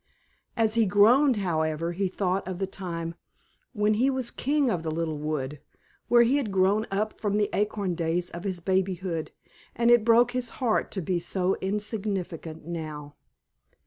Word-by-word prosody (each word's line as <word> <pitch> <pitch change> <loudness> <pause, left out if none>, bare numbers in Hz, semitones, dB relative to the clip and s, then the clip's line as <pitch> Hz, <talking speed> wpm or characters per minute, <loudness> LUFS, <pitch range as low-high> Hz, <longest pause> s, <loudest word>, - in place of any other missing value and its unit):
As 220 -1 +2
he 225 -2 +3
groaned, 240 +8 +5
however, 165 -4 -1
he 190 +3 -1
thought 185 0 -1
of 185 -1 -4
the 195 - -1
time 170 -3 -5 0.6
when 210 -2 +1
he 245 +6 +2
was 260 -3 -1
king 285 +1 +1
of 175 - -1
the 160 - -3
little 160 -1 -2
wood, 150 -2 -3 0.5
where 240 0 +6
he 250 +4 +3
had 245 -8 -2
grown 195 +3 +2
up 210 +2 -2
from 205 -1 0
the 210 -1 +1
acorn 205 -3 0
days 170 +1 -1
of 170 +1 -7
his 190 -3 -3
babyhood, 185 -2 -1 0.5
and 235 +1 +3
it 240 -2 +6
broke 235 +2 +5
his 250 -1 -1
heart 240 -5 +1
to 190 - -2
be 175 +2 0
so 180 +2 0
insignificant 195 -6 -3
now. 155 -3 -6
195 Hz, 170 wpm, -27 LUFS, 170-220 Hz, 0.6 s, where